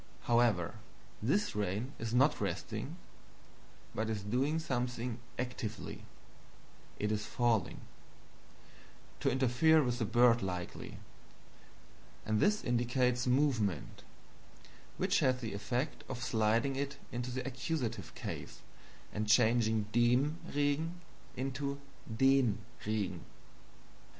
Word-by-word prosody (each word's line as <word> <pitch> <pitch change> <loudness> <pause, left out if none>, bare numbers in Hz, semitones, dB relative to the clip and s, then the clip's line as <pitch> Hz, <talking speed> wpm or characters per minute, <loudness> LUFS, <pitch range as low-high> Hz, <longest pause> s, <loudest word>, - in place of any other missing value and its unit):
However, 115 -8 +2 0.4
this 200 - +1
rain 105 +6 -2
is 115 -1 -3
not 135 +5 +3
resting, - - -3 1.0
but 110 0 -1
is 105 -3 -2
doing 130 +9 +1
something 125 -5 -2 0.2
ACTIVELY, 120 -4 -4 0.9
it 105 0 -1
is 105 0 -1
falling 115 -5 +1 1.4
to - - +2
interfere 135 +5 +4
with 120 -1 -1
the 115 - +1
bird, 120 +1 +5
likely 90 -2 -4 1.3
and 110 0 +1
this 210 - +3
indicates 125 +1 +1
MOVEMENT, 125 - +1 1.0
which - - +2
has 130 0 +2
the 115 -5 -4
effect 120 +8 -2
of 120 - -4
sliding 115 +3 +2
it 140 0 -3
into 120 +1 -3
the 130 +1 -3
Accusative 130 -2 -3
case - - -6 0.5
and 105 0 -2
changing 110 -1 +4
DEM 125 +7 +3
Regen 145 +4 0 0.4
into 135 +2 -2 0.4
DEN 135 -4 +4 0.3
Regen." 100 -5 -1
120 Hz, 105 wpm, -34 LUFS, 110-135 Hz, 1.4 s, bird